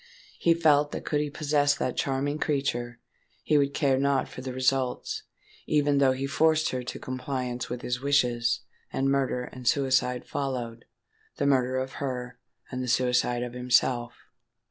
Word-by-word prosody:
He 165 Hz, -1 st, +4 dB
felt 150 Hz, -3 st, +3 dB
that -, -, -5 dB
could 150 Hz, -1 st, +1 dB
he 150 Hz, -, -2 dB
possess 145 Hz, -1 st, +2 dB
that 130 Hz, -, -2 dB
charming 140 Hz, +2 st, -1 dB
creature, 120 Hz, -5 st, -1 dB, 0.4 s
he 150 Hz, +4 st, +3 dB
would 140 Hz, 0 st, 0 dB
care 135 Hz, -2 st, +2 dB
not 140 Hz, -1 st, +1 dB
for -, -, -9 dB
the 130 Hz, 0 st, -5 dB
result—even 135 Hz, +3 st, -1 dB
though 135 Hz, -2 st, +4 dB
he 135 Hz, +1 st, -3 dB
forced 155 Hz, +2 st, +2 dB
her 130 Hz, -, -2 dB
to 125 Hz, -, -6 dB
compliance 125 Hz, -1 st, -4 dB
with 125 Hz, 0 st, -5 dB
his 125 Hz, +1 st, -2 dB
wishes, 120 Hz, -4 st, +2 dB, 0.3 s
and 135 Hz, +1 st, +1 dB
murder 135 Hz, -2 st, 0 dB
and 125 Hz, 0 st, -9 dB
suicide 130 Hz, -2 st, +2 dB
followed,—the 120 Hz, -1 st, -6 dB
murder 130 Hz, -2 st, +2 dB
of 130 Hz, 0 st, -2 dB
her, 125 Hz, -2 st, -4 dB, 0.3 s
and 130 Hz, -, -3 dB
the 125 Hz, -, -3 dB
suicide 125 Hz, 0 st, +2 dB
of 120 Hz, -1 st, -5 dB
himself! 125 Hz, -1 st, +1 dB
130 Hz, 155 wpm, -27 LUFS, 125-140 Hz, 0.4 s, He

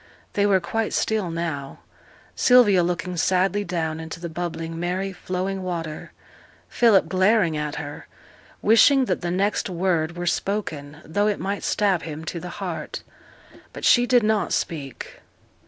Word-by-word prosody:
They 205 Hz, 0 st, +2 dB
were 195 Hz, -2 st, +4 dB
quite 220 Hz, +5 st, -2 dB
still 215 Hz, -5 st, 0 dB
now. 165 Hz, -5 st, -4 dB, 0.6 s
Sylvia 235 Hz, -7 st, +5 dB
looking 180 Hz, +1 st, -2 dB
sadly 190 Hz, +4 st, +2 dB
down 160 Hz, -3 st, -2 dB
into 160 Hz, +1 st, -7 dB
the 170 Hz, 0 st, -5 dB
bubbling, 165 Hz, 0 st, -5 dB
merry, 185 Hz, +3 st, -2 dB
flowing 185 Hz, +1 st, -3 dB
water: 165 Hz, -4 st, -5 dB, 0.6 s
Philip 220 Hz, -8 st, +4 dB
glaring 185 Hz, -1 st, +3 dB
at 150 Hz, -1 st, -3 dB
her, 145 Hz, -1 st, -7 dB, 0.6 s
wishing 260 Hz, +5 st, +6 dB
that 185 Hz, -6 st, -1 dB
the 175 Hz, -, -2 dB
next 195 Hz, +3 st, 0 dB
word 170 Hz, -2 st, 0 dB
were 175 Hz, -, -3 dB
spoken, 155 Hz, -7 st, -2 dB
though 205 Hz, +6 st, 0 dB
it 210 Hz, -, 0 dB
might 200 Hz, +1 st, -3 dB
stab 195 Hz, -5 st, +1 dB
him 160 Hz, 0 st, -7 dB
to 170 Hz, -, -4 dB
the 180 Hz, -, -7 dB
heart. 180 Hz, -3 st, -5 dB, 0.7 s
But -, -, -5 dB
she 245 Hz, 0 st, +5 dB
did 245 Hz, -2 st, +4 dB
not 215 Hz, -1 st, +1 dB
speak. 140 Hz, -6 st, -4 dB
180 Hz, 150 wpm, -23 LUFS, 165-200 Hz, 0.7 s, wishing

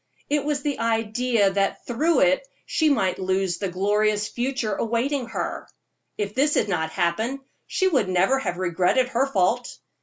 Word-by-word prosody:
It 295 Hz, -1 st, +2 dB
was 290 Hz, -2 st, -1 dB
the 290 Hz, -2 st, -2 dB
idea 225 Hz, -1 st, +1 dB
that 195 Hz, 0 st, -1 dB
through 310 Hz, +8 st, +1 dB
it -, -, +3 dB, 0.2 s
she 315 Hz, -1 st, +2 dB
might 195 Hz, -10 st, +1 dB
lose 190 Hz, -1 st, 0 dB
the 195 Hz, -, -2 dB
glorious 210 Hz, +3 st, +1 dB
future 245 Hz, -3 st, -2 dB
awaiting 235 Hz, +5 st, -1 dB
her; 230 Hz, -, -4 dB, 0.5 s
if 205 Hz, -1 st, -3 dB
this 290 Hz, +5 st, +2 dB
had -, -, +2 dB
not 160 Hz, -5 st, -1 dB
happened, 190 Hz, +10 st, -1 dB, 0.3 s
she 380 Hz, -, +1 dB
would 265 Hz, -, +1 dB
never 190 Hz, +9 st, +2 dB
have 175 Hz, -9 st, -3 dB
regretted 185 Hz, +8 st, +1 dB
her 260 Hz, +2 st, +1 dB
fault. 235 Hz, +1 st, 0 dB
225 Hz, 160 wpm, -24 LUFS, 195-270 Hz, 0.5 s, it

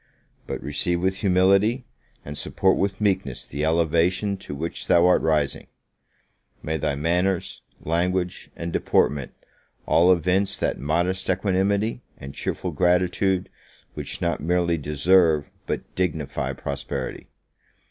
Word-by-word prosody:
but -, -, -4 dB
receive 75 Hz, +5 st, 0 dB
with 95 Hz, +1 st, 0 dB
humility, 100 Hz, +6 st, +3 dB, 0.4 s
and 75 Hz, -, -6 dB
support 95 Hz, +5 st, +1 dB
with 95 Hz, 0 st, -1 dB
meekness 95 Hz, -, -1 dB
the 70 Hz, +2 st, -4 dB
elevation 85 Hz, +5 st, +2 dB
to 85 Hz, -6 st, -8 dB
which 80 Hz, +4 st, -4 dB
thou 85 Hz, 0 st, +5 dB
art 90 Hz, -, +4 dB
rising! 75 Hz, -3 st, 0 dB, 1.0 s
May 80 Hz, +1 st, -1 dB
thy 70 Hz, -1 st, -1 dB
manners, 85 Hz, +5 st, 0 dB, 0.2 s
language, 90 Hz, +2 st, -1 dB
and 85 Hz, 0 st, -5 dB
deportment, 70 Hz, -3 st, +1 dB, 0.5 s
all 85 Hz, +4 st, +5 dB
evince 90 Hz, +2 st, +1 dB
that -, -, -1 dB
modest 85 Hz, +6 st, -1 dB
equanimity, 100 Hz, +4 st, +1 dB, 0.2 s
and 70 Hz, 0 st, -9 dB
cheerful 90 Hz, -, -3 dB
gratitude, 90 Hz, +3 st, +1 dB, 0.5 s
which -, -, -6 dB
not 85 Hz, -1 st, 0 dB
merely 85 Hz, 0 st, +1 dB
deserve, 75 Hz, +1 st, +3 dB, 0.2 s
but -, -, -4 dB
dignify 75 Hz, -7 st, -2 dB
prosperity! 70 Hz, 0 st, -5 dB
85 Hz, 120 wpm, -24 LUFS, 75-95 Hz, 1.0 s, thou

